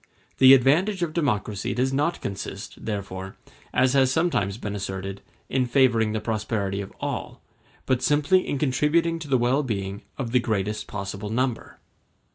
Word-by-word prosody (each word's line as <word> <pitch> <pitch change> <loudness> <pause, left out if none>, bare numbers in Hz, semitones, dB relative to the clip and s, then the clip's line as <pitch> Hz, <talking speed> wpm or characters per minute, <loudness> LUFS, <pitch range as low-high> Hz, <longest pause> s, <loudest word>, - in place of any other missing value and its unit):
The 130 0 +10
advantage 175 +10 +2
of 160 -2 -2
democracy 105 - -1
does 130 +2 +1
not 150 +5 0
consist, 100 -1 -6
therefore, 95 -3 -5 0.4
as 125 +1 +3
has 135 -2 +4
sometimes 130 - +1
been 105 -3 -5
asserted, 95 0 -5 0.3
in 130 -2 0
favoring 120 -4 +3
the 110 - -1
prosperity 105 -2 -2
of 100 - -8
all, - - -4 0.5
but 130 -1 +1
simply 150 +7 +3
in 145 - -1
contributing 150 +5 +1
to 160 - -7
the 135 -2 +3
well 125 +4 +2
being 100 -5 -3 0.2
of 120 -4 -3
the 125 - +4
greatest 105 -2 -2
possible 100 +1 -5
number. 125 +1 -2
120 Hz, 155 wpm, -25 LUFS, 100-140 Hz, 0.5 s, The